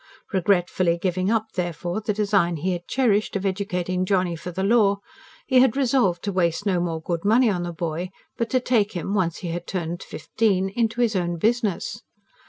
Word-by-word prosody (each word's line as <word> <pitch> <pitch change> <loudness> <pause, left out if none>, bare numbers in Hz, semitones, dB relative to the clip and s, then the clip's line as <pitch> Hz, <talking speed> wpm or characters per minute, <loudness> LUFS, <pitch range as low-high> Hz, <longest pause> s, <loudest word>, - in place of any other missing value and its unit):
Regretfully 180 -2 +2
giving 185 +1 0
up, 220 -1 0
therefore, 175 +2 -3
the 215 - -1
design 200 -4 +1
he 175 +5 -1
had 175 -1 -4
cherished 215 -7 +1
of 200 0 -2
educating 185 -2 -1
Johnny 185 -2 +1
for 165 +2 -7
the 185 +2 -3
law, 200 -1 +4 0.5
he 260 -2 +4
had 260 0 +4
resolved 240 -10 +2
to 200 - -1
waste 180 +1 0
no 190 -3 +2
more 170 -2 -2
good 165 +1 -3
money 225 +3 +4
on 180 -3 -2
the 175 0 -3
boy, 170 +1 -3 0.3
but 230 - -2
to 255 - +2
take 225 -4 +1
him, 185 +2 -3
once 175 -5 0
he 175 -3 -5
was 175 +1 -3
turned 175 -2 -3
fifteen, 190 +4 0
into 225 +3 0
his 230 -3 +2
own 175 -2 -1
business. 215 +1 0
190 Hz, 190 wpm, -24 LUFS, 175-215 Hz, 0.5 s, law